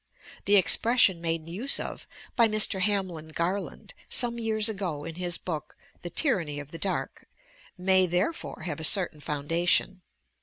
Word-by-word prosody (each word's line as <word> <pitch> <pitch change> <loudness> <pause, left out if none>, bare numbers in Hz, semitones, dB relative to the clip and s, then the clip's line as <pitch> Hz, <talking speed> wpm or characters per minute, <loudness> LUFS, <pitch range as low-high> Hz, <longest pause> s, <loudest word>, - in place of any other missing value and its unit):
The 205 - +5
expression 190 +1 +4
made 165 -1 -2
use 215 +12 0
of - - -7 0.3
by 235 -2 +5
Mr. 215 -2 +4
Hamlin 185 -6 -1
Garland 170 +5 -4 0.2
some 235 -1 +1
years 220 -1 0
ago 185 -9 -4
in 165 - -7
his 175 0 -2
book 160 -4 -6 0.2
"The 175 - -6
Tyranny 170 - 0
of 145 0 -10
the 165 - -8
Dark" 195 - -4 0.5
may, 185 0 +3
therefore, 180 - -3
have 160 -4 -4
a - - -7
certain 175 -3 +2
foundation. 165 +6 0
180 Hz, 150 wpm, -27 LUFS, 165-205 Hz, 0.5 s, The